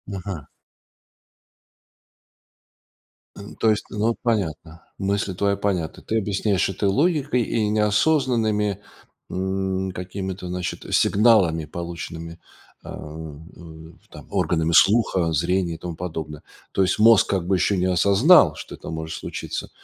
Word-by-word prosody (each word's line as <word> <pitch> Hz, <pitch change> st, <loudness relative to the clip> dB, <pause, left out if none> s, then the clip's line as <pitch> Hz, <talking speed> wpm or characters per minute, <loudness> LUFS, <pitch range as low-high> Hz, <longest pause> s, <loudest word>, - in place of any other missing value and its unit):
Ага. 90 Hz, -5 st, -6 dB, 2.9 s
Э, -, -, -11 dB, 0.2 s
то 110 Hz, -, +3 dB
есть, 105 Hz, -, -1 dB
ну, 110 Hz, +2 st, 0 dB
понятно, 80 Hz, -, -2 dB
мысли 100 Hz, -1 st, -1 dB
твои 100 Hz, +2 st, 0 dB
понятны. 95 Hz, -5 st, -2 dB
Ты 110 Hz, -, -1 dB
объясняешь 100 Hz, -1 st, 0 dB
это 95 Hz, +1 st, -1 dB
логикой 145 Hz, -, +1 dB
и 110 Hz, -1 st, -1 dB
неосознанными, 105 Hz, -, +1 dB, 0.5 s
м, 95 Hz, 0 st, -2 dB
какими-то, 95 Hz, +1 st, -6 dB
значит, 90 Hz, 0 st, -4 dB
сигналами, 100 Hz, -8 st, +3 dB
полученными, 85 Hz, 0 st, -7 dB, 0.4 s
а, -, -, -9 dB, 1.2 s
там -, -, -12 dB
органами 80 Hz, -1 st, 0 dB
слуха, 95 Hz, -4 st, +4 dB
зрения 85 Hz, +2 st, 0 dB
и -, -, -9 dB
тому 85 Hz, -2 st, -6 dB
подобное. 80 Hz, -4 st, -6 dB, 0.3 s
То 95 Hz, -, 0 dB
есть 95 Hz, -, 0 dB
мозг 115 Hz, -1 st, +6 dB
как 95 Hz, -3 st, 0 dB
бы 95 Hz, -, +2 dB
еще 100 Hz, +2 st, +1 dB
не 90 Hz, -, +1 dB
осознал, 100 Hz, -, +5 dB
что -, -, -9 dB
это -, -, -10 dB
может 80 Hz, 0 st, -5 dB
случиться, -, -, -6 dB
95 Hz, 120 wpm, -23 LUFS, 85-105 Hz, 2.9 s, мозг